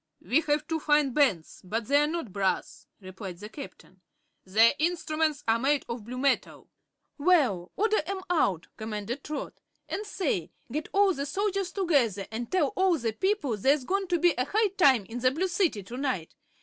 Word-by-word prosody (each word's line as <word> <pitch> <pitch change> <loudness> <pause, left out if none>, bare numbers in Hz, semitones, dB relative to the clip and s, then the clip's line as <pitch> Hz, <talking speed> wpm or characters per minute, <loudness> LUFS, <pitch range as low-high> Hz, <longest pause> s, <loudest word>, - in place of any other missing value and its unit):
"We 295 +6 +2
have 295 +1 +1
two 325 -1 -1
fine 295 -2 +3
bands, 235 - +1
but 215 +5 -3
they 285 +4 +4
are 295 - +2
not 310 - -4
brass," 195 -2 -2
replied 185 -1 -8
the 210 +3 -9
Captain. 220 -8 -11 0.4
"Their 220 +5 +5
instruments 310 -2 0
are 225 +1 +3
made 280 +3 +1
of 235 -3 -6
blue 250 +2 -6
metal." 275 +1 -1 0.5
"Well, 280 - +2
order 430 +1 +2
'em 385 0 -3
out," 195 - +1
commanded 220 +4 -5
Trot. 300 -1 -6 0.3
"And, 415 - -3
say; 295 - -2 0.2
get 305 +4 -3
all 395 -1 +4
the 280 -2 -4
soldiers 390 +3 -1
together 275 - +1
and 230 +1 -5
tell 340 -7 +2
all 370 0 +2
the 230 -5 -2
people 340 - 0
there's 270 +6 +2
going 390 +3 -1
to 350 - +1
be 345 0 +4
a 250 - +2
high 425 +7 +2
time 275 - +4
in 230 +5 -6
the 255 +1 +4
Blue 325 +8 -1
City 350 - 0
to 235 +6 -8
night. 255 - -2
280 Hz, 185 wpm, -28 LUFS, 225-345 Hz, 0.5 s, Their